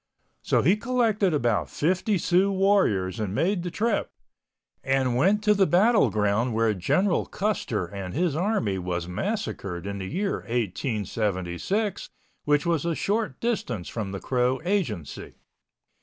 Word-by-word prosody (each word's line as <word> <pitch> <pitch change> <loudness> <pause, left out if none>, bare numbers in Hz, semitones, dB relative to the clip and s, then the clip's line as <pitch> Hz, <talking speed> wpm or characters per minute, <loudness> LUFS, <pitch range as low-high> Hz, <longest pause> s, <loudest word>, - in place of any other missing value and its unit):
So - - +1
he 185 +8 +4
collected 220 -5 +1
about 120 -8 0
fifty 185 +6 0
Sioux 185 +3 +2
warriors 185 - +2
and 105 -2 -2
made 180 - +1
the 175 - -3
trip, 220 +5 -1 0.7
and 135 -2 +1
went 195 +11 +3
to 210 0 +5
the 195 -2 +3
battle 210 +5 +4
ground 110 +3 0
where 115 -1 +2
General 175 - +1
Custer 195 - -1
and 95 0 -7
his 165 -2 +1
army 160 - 0
was 90 -1 -3
massacred 95 - -3
in 100 0 -4
the 95 - -5
year 195 - -1
1876, 110 - -2 0.4
which 145 +1 +2
was 165 -4 +1
a 170 -1 -1
short 215 +5 -1
distance 125 - -2
from 105 -4 -4
the 100 - -5
Crow 125 +2 0
Agency. 140 - -2
145 Hz, 140 wpm, -26 LUFS, -, 0.7 s, to